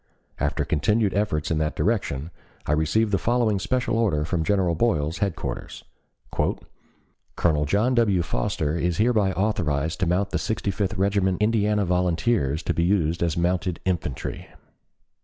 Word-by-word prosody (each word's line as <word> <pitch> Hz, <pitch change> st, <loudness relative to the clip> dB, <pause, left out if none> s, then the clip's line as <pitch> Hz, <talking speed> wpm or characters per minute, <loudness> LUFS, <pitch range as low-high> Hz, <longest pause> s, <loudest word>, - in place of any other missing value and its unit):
After -, -, 0 dB
continued 105 Hz, +6 st, +1 dB
efforts 90 Hz, -8 st, -1 dB
in 80 Hz, -, +1 dB
that 75 Hz, 0 st, -1 dB
direction, 85 Hz, -, -1 dB, 0.3 s
I -, -, -1 dB
received 80 Hz, +9 st, +2 dB
the 100 Hz, -, +2 dB
following 115 Hz, -4 st, +1 dB
Special 125 Hz, +2 st, 0 dB
Order 80 Hz, -10 st, +1 dB
from 85 Hz, 0 st, -1 dB
General 95 Hz, -1 st, +1 dB
Boyle's 80 Hz, -4 st, 0 dB
headquarters. 100 Hz, -4 st, -4 dB, 1.5 s
"Colonel 75 Hz, -3 st, +1 dB
John 105 Hz, -, +2 dB
W. 105 Hz, -7 st, +3 dB
Foster 75 Hz, +2 st, -1 dB
is 85 Hz, 0 st, -1 dB
hereby 110 Hz, -3 st, +2 dB
authorized 85 Hz, -6 st, -1 dB
to 90 Hz, -, +1 dB
mount 95 Hz, +3 st, 0 dB
the -, -, 0 dB
Sixty 105 Hz, -2 st, -2 dB
fifth 100 Hz, +1 st, -2 dB
Regiment 95 Hz, -1 st, +1 dB
Indiana 105 Hz, -1 st, +2 dB
Volunteers 90 Hz, -, +1 dB
to -, -, 0 dB
be -, -, 0 dB
used 85 Hz, -3 st, +1 dB
as 85 Hz, -2 st, 0 dB
mounted 90 Hz, 0 st, 0 dB
infantry. 85 Hz, -8 st, -3 dB
90 Hz, 145 wpm, -24 LUFS, 80-105 Hz, 1.5 s, W